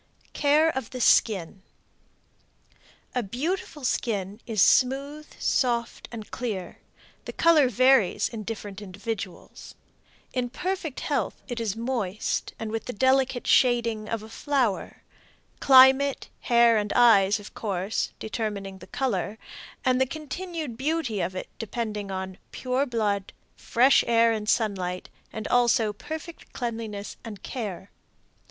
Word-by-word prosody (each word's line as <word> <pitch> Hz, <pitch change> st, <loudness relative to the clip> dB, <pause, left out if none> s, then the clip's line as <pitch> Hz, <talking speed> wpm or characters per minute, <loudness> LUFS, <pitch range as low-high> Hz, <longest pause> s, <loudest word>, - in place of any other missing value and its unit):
CARE 300 Hz, +2 st, +3 dB
OF 265 Hz, -4 st, -4 dB
THE 255 Hz, -, -7 dB
SKIN. 195 Hz, -6 st, +3 dB, 1.5 s
A 250 Hz, -, 0 dB
beautiful 295 Hz, -, -3 dB
skin 205 Hz, -4 st, -2 dB
is 220 Hz, -3 st, -2 dB
smooth, 275 Hz, +8 st, +3 dB
soft 235 Hz, -3 st, 0 dB
and 220 Hz, -3 st, -8 dB
clear; 205 Hz, -8 st, -4 dB, 0.5 s
the -, -, -5 dB
color 315 Hz, -6 st, +4 dB
varies 255 Hz, -4 st, +4 dB
in 225 Hz, -2 st, -7 dB
different 205 Hz, -2 st, -6 dB
individuals. 200 Hz, -1 st, -7 dB, 0.6 s
In 250 Hz, -1 st, -1 dB
perfect 340 Hz, 0 st, -4 dB
health 270 Hz, -8 st, -2 dB
it 245 Hz, -3 st, -4 dB
is 220 Hz, -3 st, -2 dB
moist 225 Hz, -4 st, -2 dB
and 220 Hz, -1 st, -5 dB
with 225 Hz, 0 st, -3 dB
the 250 Hz, -, -5 dB
delicate 260 Hz, +1 st, +2 dB
shading 235 Hz, -4 st, +2 dB
of 225 Hz, -2 st, -3 dB
a 220 Hz, -, -11 dB
flower 250 Hz, -5 st, -1 dB, 0.6 s
climate, 265 Hz, +1 st, +6 dB
hair 235 Hz, -1 st, +4 dB
and 210 Hz, 0 st, -3 dB
eyes, 210 Hz, -4 st, +5 dB
of 205 Hz, -, -11 dB
course, 195 Hz, -1 st, -2 dB
determining 205 Hz, -3 st, -4 dB
the -, -, -12 dB
color, 220 Hz, -6 st, -2 dB, 0.5 s
and 255 Hz, 0 st, +3 dB
the 265 Hz, -, +3 dB
continued 310 Hz, -2 st, -6 dB
beauty 265 Hz, -, -1 dB
of 180 Hz, +2 st, -3 dB
it 185 Hz, -, -5 dB
depending 215 Hz, -2 st, -4 dB
upon 190 Hz, -1 st, -5 dB
pure 260 Hz, +2 st, -1 dB
blood, 210 Hz, -5 st, -1 dB, 0.2 s
fresh 255 Hz, +4 st, +4 dB
air 230 Hz, 0 st, +4 dB
and 215 Hz, -1 st, -2 dB
sunlight, 185 Hz, -6 st, -1 dB, 0.4 s
also 240 Hz, -3 st, +3 dB
perfect 315 Hz, -, -8 dB
cleanliness 225 Hz, -4 st, -5 dB
and 215 Hz, -4 st, -9 dB
care. 200 Hz, -6 st, -6 dB
230 Hz, 125 wpm, -26 LUFS, 205-260 Hz, 1.5 s, climate